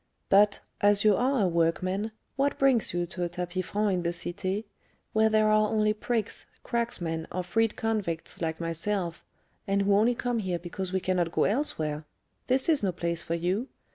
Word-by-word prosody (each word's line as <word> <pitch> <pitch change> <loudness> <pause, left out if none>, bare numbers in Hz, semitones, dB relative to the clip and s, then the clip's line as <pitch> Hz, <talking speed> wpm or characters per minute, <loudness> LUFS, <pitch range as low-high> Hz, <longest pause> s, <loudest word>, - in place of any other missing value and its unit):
But, 205 +1 +5 0.2
as 205 0 +4
you 210 -2 +5
are 255 0 +2
a - - +3
workman, 185 +5 0 0.2
what 280 +1 +1
brings 265 -4 +3
you 175 0 -1
to 180 +1 -5
a 175 - -1
tapis 180 +1 -4
franc 205 -1 +1
in 180 - 0
the 170 - 0
Cité, 185 +4 -2 0.5
where 220 0 +4
there 215 0 +3
are 215 0 +4
only 215 -1 +2
prigs, 225 0 -3 0.2
cracksmen 175 -9 -2
or 185 - -2
freed 225 +4 +1
convicts 205 -9 -3
like 160 -1 -2
myself, 170 +1 -2 0.4
and 200 0 +2
who 200 0 +3
only 230 +4 +3
come 245 -1 -1
here 185 -4 -1
because 180 +2 -5
we 190 0 0
cannot 180 -2 0
go - - +2
elsewhere? 160 - 0 0.4
This 260 +1 +2
is 315 -4 +3
no 195 -3 +1
place 170 -1 -2
for 170 - -2
you. 185 +9 -1
195 Hz, 185 wpm, -28 LUFS, 175-220 Hz, 0.5 s, But